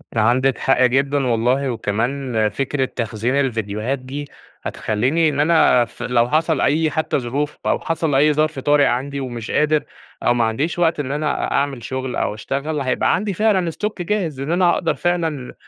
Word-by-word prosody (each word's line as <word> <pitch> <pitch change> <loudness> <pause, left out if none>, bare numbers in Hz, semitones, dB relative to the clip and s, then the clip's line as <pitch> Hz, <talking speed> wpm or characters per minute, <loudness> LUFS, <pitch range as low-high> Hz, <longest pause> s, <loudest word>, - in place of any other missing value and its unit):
عندِك 125 +4 +2
حق 135 -1 +2
جدًا 135 +2 +1
والله. 125 +3 +1
وكمان 115 +1 -1
فكرة 135 +4 -1
تخزين 115 +1 -2
الفيديوهات 115 -1 -1
دي 135 +3 -6 0.4
هتخليني 130 +10 0
إن 145 -1 -3
أنا 150 -6 +4
في 120 +1 -7
لو 120 -1 +2
حصل 160 +1 +1
أي 155 +1 +2
حتى 155 -1 0
ظروف 140 +5 -3
أو - - +1
حصل 160 -3 -1
أي 150 +2 +4
ظرف 155 -1 0
طارئ 145 +1 +3
عندي 135 +3 -1
ومش 120 -4 -5
قادر 150 0 +2 0.4
أو 120 - +3
ما 120 -1 +1
عنديش 140 +10 -1
وقت 165 -3 +2
إن 135 -1 -3
أنا 150 0 -1
أ - - -7
أعمل 140 -4 -1
شغل 130 +1 -4
أو - - -1
أشتغل، 140 +7 -3
هيبقى 130 -1 +1
عندي 200 +2 -2
فعلًا 190 -3 +1
stock 210 +4 -4
جاهز، 175 -6 -2
إن 140 +4 -3
أنا 175 0 +3
أقدر 165 - 0
فعلًا 165 -7 -2
140 Hz, 175 wpm, -20 LUFS, 125-155 Hz, 0.4 s, أنا